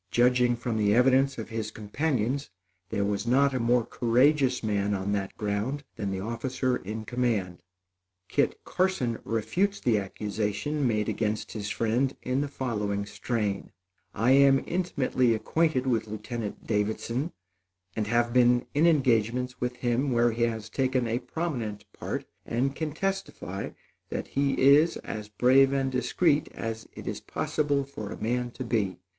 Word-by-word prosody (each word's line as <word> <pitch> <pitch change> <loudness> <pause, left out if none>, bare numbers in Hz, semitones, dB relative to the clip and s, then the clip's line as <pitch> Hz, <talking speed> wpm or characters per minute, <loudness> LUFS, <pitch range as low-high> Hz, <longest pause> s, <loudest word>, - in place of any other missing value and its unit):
Judging 125 0 +3
from 120 -1 -3
the 105 -1 +3
evidence 135 +2 +4
of 110 -2 -6
his 115 -2 -3
companions, 130 +4 -1 0.4
there 100 -2 0
was 100 +2 -1
not 140 +3 +4
a 130 - 0
more 120 0 +2
courageous 130 +2 +2
man 105 -1 0
on 95 +1 -2
that 100 -1 -2
ground 105 +7 -2
than 100 - -3
the 95 -1 -3
officer 125 +4 -1
in 110 +3 -6
command. 110 -7 -1 0.7
Kit - - +1
Carson 180 -12 0
refutes 185 - 0
the 115 -4 +2
accusation 105 +7 -2
made 105 -3 0
against 110 -1 -1
his 105 -2 -4
friend 120 +5 0
in 130 +2 0
the 145 - -1
following 105 -7 -2
strain: 105 -1 -2 0.4
"I 115 +5 +2
am 135 0 +6
intimately 135 -9 +1
acquainted 155 +2 +1
with 115 -4 +1
Lieutenant 110 0 -5
Davidson 115 +7 -1 0.6
and 110 -2 -1
have 120 +1 +1
been 125 0 +4
in 155 +4 +4
engagements 125 -4 +2
with 125 0 -1
him 125 +3 0
where 120 0 +3
he 115 +1 -4
has 110 -2 -3
taken 130 +2 0
a 115 +2 0
prominent 125 -7 -4
part - - -4 0.2
and 135 +4 -1
can 160 -2 -3
testify 175 - -3 0.4
that - - -4
he 140 0 +1
is 145 +5 +6
as 105 -1 -6
brave 130 +5 +5
and 135 -1 0
discreet 145 +5 +2
as 115 0 -5
it - - -9
is - - -4
possible 145 -2 0
for 110 -7 -7
a - - -6
man 120 +2 -1
to 125 - -7
be. 105 -6 0
120 Hz, 155 wpm, -28 LUFS, 110-135 Hz, 0.7 s, am